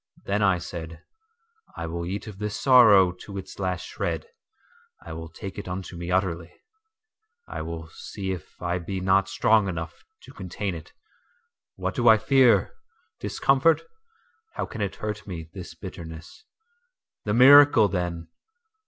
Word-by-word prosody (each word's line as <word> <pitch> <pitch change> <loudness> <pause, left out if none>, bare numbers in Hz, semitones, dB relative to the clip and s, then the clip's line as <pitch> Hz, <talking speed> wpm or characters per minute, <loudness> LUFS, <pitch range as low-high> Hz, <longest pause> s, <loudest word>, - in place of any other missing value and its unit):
…Then 100 +2 0
I 95 -3 +3
said: 85 -2 -8 0.7
I - - -4
will 85 +1 -4
eat 100 +3 -4
of 105 -3 -10
this 105 -1 -3
sorrow 110 -9 +7
to 100 -1 -8
its 95 - -8
last 90 -2 -2
shred,I 470 0 -8
will 80 0 -7
take 95 +4 -8
it 100 - -8
unto 90 0 -6
me 85 0 -6
utterly,I 435 - -6
will 80 0 -6
see 95 +3 -6
if 90 -5 -8
I 90 0 -2
be 95 +2 -4
not 95 +1 +2
strong 110 -2 +3
enough 85 -2 -6 0.2
to - - -14
contain 95 +1 -4
it.…What 465 - -10
do 120 -2 0
I 110 - +8
fear? 130 +1 +4 0.5
Discomfort? 140 +4 +2 0.7
How - - -2
can 110 - -7
it 100 -2 -2
hurt 105 0 -5
me, 80 -4 -7
this 90 -3 -9
bitterness? 85 - -10 0.8
The 105 0 0
miracle, 135 -3 +8
then! 85 -3 -3
95 Hz, 140 wpm, -25 LUFS, 85-125 Hz, 0.8 s, I